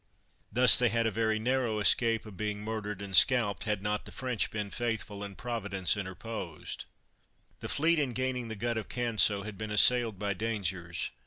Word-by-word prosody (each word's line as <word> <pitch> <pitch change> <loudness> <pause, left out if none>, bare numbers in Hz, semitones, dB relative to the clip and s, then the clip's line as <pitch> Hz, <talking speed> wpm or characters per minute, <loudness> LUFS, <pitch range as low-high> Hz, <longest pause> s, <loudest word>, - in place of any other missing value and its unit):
Thus 125 +2 +7
they 125 -1 +3
had 115 0 0
a 110 - +1
very 110 +1 0
narrow 120 -1 0
escape 115 +2 +3
of 105 -3 -10
being 105 +1 -3
murdered 105 -2 -4
and 95 -1 -3
scalped, 115 -2 +4
had 105 -3 -1
not 105 0 -2
the - - -10
French 125 -4 -2
been 105 -2 -4
faithful, 110 -4 -3
and 100 -1 -8
Providence 100 -6 -1
interposed. 95 -3 -6 0.7
The - - -6
fleet, 165 +2 +2
in 135 -4 -1
gaining 130 -1 -2
the 110 - -5
Gut 115 +2 -2
of 110 - -8
Canso, 110 -4 +2
had 105 -1 -8
been 110 0 -4
assailed 115 +1 +4
by 100 0 -1
dangers. 95 -5 -3
110 Hz, 180 wpm, -30 LUFS, 100-120 Hz, 0.7 s, Thus